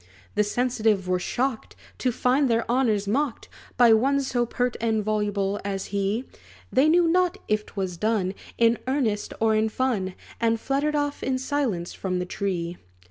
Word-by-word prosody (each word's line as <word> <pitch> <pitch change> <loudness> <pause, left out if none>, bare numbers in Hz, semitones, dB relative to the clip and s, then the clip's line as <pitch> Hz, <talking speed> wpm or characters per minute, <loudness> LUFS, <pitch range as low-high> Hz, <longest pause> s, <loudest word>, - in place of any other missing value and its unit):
The 210 - +3
sensitive 220 -3 +1
were 180 0 +1
shocked, 250 +4 -2 0.2
To 255 - +1
find 255 +3 +2
their 230 0 +2
honors 230 -5 +1
mocked 265 +3 -1 0.3
By 240 -2 +7
one 270 +5 +3
so 245 -3 0
pert 245 0 -1
and 220 -2 +1
voluble 205 -1 -1
as 195 -1 -3
he; 200 +5 0 0.5
They 275 +4 +5
knew 345 +1 +4
not 360 +2 +2
if 215 0 0
't - - -15
was 190 -3 -3
done 210 -2 0 0.2
In 230 0 +4
earnest 245 -7 0
or 220 0 +3
in 220 +1 +2
fun; 215 -6 -1 0.2
And 230 -1 +2
fluttered 280 +5 0
off 290 -1 -1
in 260 0 0
silence 255 -10 -2
from 185 -1 -2
the 180 - -2
tree. 175 -2 -3
225 Hz, 170 wpm, -25 LUFS, 200-260 Hz, 0.5 s, By